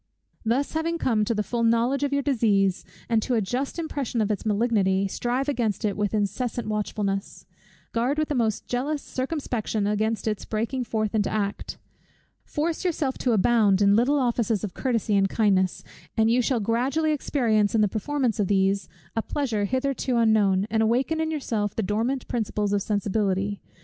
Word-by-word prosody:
Thus 240 Hz, +5 st, 0 dB
having 330 Hz, +1 st, -1 dB
come 225 Hz, -9 st, +1 dB
to 230 Hz, -, 0 dB
the 210 Hz, -, 0 dB
full 235 Hz, +2 st, -2 dB
knowledge 235 Hz, +4 st, +2 dB
of 285 Hz, -1 st, 0 dB
your 280 Hz, 0 st, +1 dB
disease, 205 Hz, -8 st, +2 dB, 0.2 s
and 225 Hz, -2 st, +2 dB
to 250 Hz, +2 st, 0 dB
a -, -, +3 dB
just 250 Hz, -, -2 dB
impression 285 Hz, -7 st, -3 dB
of 215 Hz, -1 st, +1 dB
its 210 Hz, +1 st, -3 dB
malignity, 200 Hz, -3 st, +2 dB
strive 245 Hz, +7 st, -2 dB
against 235 Hz, -6 st, -1 dB
it 205 Hz, -, 0 dB
with 210 Hz, 0 st, -1 dB
incessant 215 Hz, +3 st, -2 dB
watchfulness. 205 Hz, -2 st, -3 dB, 0.5 s
Guard 245 Hz, +5 st, 0 dB
with 310 Hz, -1 st, +1 dB
the -, -, 0 dB
most 225 Hz, -5 st, 0 dB
jealous 280 Hz, +4 st, -2 dB
circumspection 255 Hz, -6 st, -2 dB
against 215 Hz, +2 st, 0 dB
its 210 Hz, -2 st, -1 dB
breaking 235 Hz, +4 st, -2 dB
forth 215 Hz, -2 st, -1 dB
into 210 Hz, -2 st, +1 dB
act. 205 Hz, -1 st, -3 dB, 0.7 s
Force 320 Hz, +3 st, -2 dB
yourself 305 Hz, -7 st, -1 dB
to 245 Hz, -, +1 dB
abound 210 Hz, -2 st, +4 dB
in 200 Hz, 0 st, +5 dB
little 255 Hz, +6 st, +3 dB
offices 235 Hz, -5 st, 0 dB
of 200 Hz, -4 st, -4 dB
courtesy 230 Hz, -4 st, 0 dB
and 195 Hz, -1 st, +3 dB
kindness; 190 Hz, -4 st, +1 dB, 0.3 s
and 220 Hz, 0 st, +4 dB
you 250 Hz, +2 st, +4 dB
shall 245 Hz, 0 st, +1 dB
gradually 255 Hz, +9 st, +1 dB
experience 230 Hz, -8 st, +1 dB
in 220 Hz, -, +4 dB
the 210 Hz, -, +4 dB
performance 235 Hz, +3 st, -1 dB
of 200 Hz, -, +2 dB
these 195 Hz, 0 st, +1 dB, 0.3 s
a 225 Hz, -, +1 dB
pleasure 225 Hz, -6 st, -1 dB
hitherto 260 Hz, +1 st, -1 dB
unknown, 210 Hz, -4 st, +3 dB
and 220 Hz, 0 st, +2 dB
awaken 260 Hz, +8 st, +1 dB
in 320 Hz, -, -1 dB
yourself 225 Hz, -10 st, -2 dB
the 225 Hz, -, -1 dB
dormant 225 Hz, +7 st, -1 dB
principles 210 Hz, -3 st, -1 dB
of 200 Hz, -, +1 dB
sensibility. 200 Hz, -1 st, -1 dB
225 Hz, 175 wpm, -25 LUFS, 205-260 Hz, 0.7 s, in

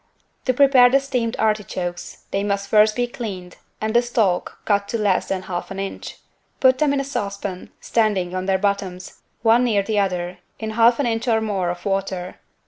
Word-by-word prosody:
To 255 Hz, -, +2 dB
prepare 265 Hz, -2 st, +6 dB
the 270 Hz, +2 st, +4 dB
steamed 250 Hz, -4 st, -2 dB
artichokes 195 Hz, -5 st, -2 dB
they 195 Hz, -, 0 dB
must 200 Hz, -1 st, -1 dB
first 215 Hz, 0 st, +5 dB
be 245 Hz, -, +1 dB
cleaned 205 Hz, -8 st, -7 dB, 0.2 s
and 220 Hz, 0 st, -2 dB
the 240 Hz, -, +5 dB
stalk 220 Hz, -7 st, 0 dB
cut 200 Hz, -1 st, +1 dB
to 230 Hz, -, -2 dB
less 205 Hz, -4 st, +1 dB
than 190 Hz, -1 st, -2 dB
half 175 Hz, -2 st, -5 dB
an 195 Hz, -, -7 dB
inch. 195 Hz, 0 st, -6 dB, 0.4 s
Put 260 Hz, -1 st, +4 dB
them 300 Hz, -2 st, +3 dB
in 280 Hz, -, +1 dB
a -, -, -1 dB
saucepan, 200 Hz, -7 st, -5 dB
standing 205 Hz, -6 st, 0 dB
on 185 Hz, 0 st, -3 dB
their 190 Hz, -1 st, +3 dB
bottoms, 195 Hz, -2 st, -3 dB, 0.2 s
one 230 Hz, +2 st, +5 dB
near 215 Hz, -5 st, +2 dB
the 210 Hz, 0 st, 0 dB
other, 180 Hz, -2 st, -2 dB, 0.2 s
in 220 Hz, -1 st, -4 dB
half 235 Hz, +2 st, +4 dB
an 285 Hz, -, +1 dB
inch 230 Hz, +1 st, -1 dB
or 225 Hz, -2 st, +3 dB
more 200 Hz, -5 st, -1 dB
of 175 Hz, 0 st, -6 dB
water. 195 Hz, -2 st, -3 dB
205 Hz, 195 wpm, -22 LUFS, 190-235 Hz, 0.4 s, prepare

